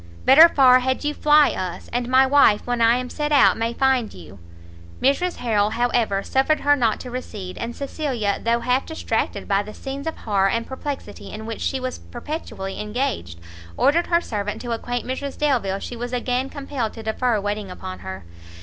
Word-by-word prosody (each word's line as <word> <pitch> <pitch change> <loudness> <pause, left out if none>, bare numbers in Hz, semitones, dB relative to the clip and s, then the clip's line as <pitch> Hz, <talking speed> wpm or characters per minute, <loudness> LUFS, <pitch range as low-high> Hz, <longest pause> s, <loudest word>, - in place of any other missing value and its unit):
better 315 +6 +9
far 255 -4 +6
had 260 +2 -1
you 295 0 0
fly 300 0 +4
us, 185 -2 -5
and 245 0 -1
my 260 +1 +5
wife 265 -6 +4
when 245 -1 -1
I 230 +1 +5
am 250 0 -4
set 295 +3 -3
out 285 -2 +5
may 230 +1 -1
find 260 -3 +1
you." 90 +2 -13 0.6
Mrs 340 +7 +1
Harrel, 210 -4 +1
however, 225 -3 0
suffered 270 +4 +1
her 290 0 +4
not 230 -6 +1
to 250 - -8
recede; 210 -7 -6
and 235 +1 -4
Cecilia, 265 -8 -2
though 235 +1 +1
half 250 +2 0
distracted 320 - -2
by 200 -1 +2
the 210 +1 -10
scenes 275 +2 -6
of 320 - -3
horror 195 -3 +1
and 230 +3 -1
perplexity 265 -5 -7
in 215 +1 -7
which 225 0 -6
she 265 - -1
was 255 0 -4
perpetually 240 - -6
engaged, 210 - -3 0.4
ordered 335 +5 +3
her 340 -1 +3
servant 210 -7 -4
to 240 - -4
acquaint 245 +1 -3
Mrs 270 +2 -4
Delvile 240 -10 0
she 240 - -7
was 245 +1 -5
again 250 +2 -1
compelled 275 -6 -4
to 225 - -9
defer 220 +1 0
waiting 205 0 -3
upon 95 - -8
her. 95 0 -8
245 Hz, 190 wpm, -22 LUFS, 210-270 Hz, 0.6 s, better